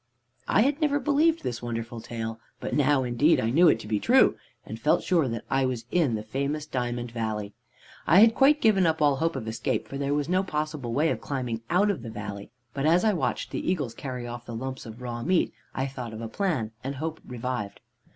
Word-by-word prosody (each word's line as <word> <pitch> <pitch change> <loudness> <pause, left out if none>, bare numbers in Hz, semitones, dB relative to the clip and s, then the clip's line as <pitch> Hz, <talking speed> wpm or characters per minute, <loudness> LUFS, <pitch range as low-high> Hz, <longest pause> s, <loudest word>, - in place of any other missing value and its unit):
"I - - +4
had 285 +4 0
never 290 -1 +2
believed 305 +4 +2
this 120 -1 -3
wonderful 115 0 -4
tale, 115 -1 -5 0.2
but - - -4
now 145 -2 +3
indeed 125 +6 +3
I 110 - 0
knew 170 +7 +6
it 115 - +4
to - - -9
be 105 -1 0
true, 260 - +5 0.3
and - - -7
felt - - +2
sure 170 -6 +2
that 115 -1 -4
I 135 0 +1
was 120 -3 -3
in 155 -10 +2
the 105 - -4
famous 140 +6 -2
Diamond 120 -3 -3
Valley. 110 -3 -3 0.5
"I 175 +7 +7
had 225 +1 +7
quite 285 +4 +4
given 195 -5 +4
up 160 0 +1
all 145 -2 +3
hope 165 +2 0
of 120 -4 -5
escape, 110 - -2
for 140 - -6
there 140 +1 0
was 145 -1 -1
no 185 +2 +2
possible 150 -8 -3
way 150 +7 +2
of - - -3
climbing 125 -5 -3
out 200 +4 +3
of 180 - -5
the 115 - -7
valley, 100 -2 -7 0.2
but 140 +2 0
as 175 +6 +4
I 215 - +4
watched 175 - -2
the - - -2
eagles 145 -11 -2
carry 125 -3 -6
off 120 0 -6
the 120 - -6
lumps 130 +1 -5
of 115 +3 -10
raw 120 -1 -4
meat, 180 +7 +1 0.2
I 135 - 0
thought 125 -4 -6
of 110 - -7
a 115 - -4
plan, 130 - -1
and 135 +2 -3
hope 160 +3 -4
revived. 125 -4 -4
135 Hz, 230 wpm, -27 LUFS, 115-165 Hz, 0.5 s, I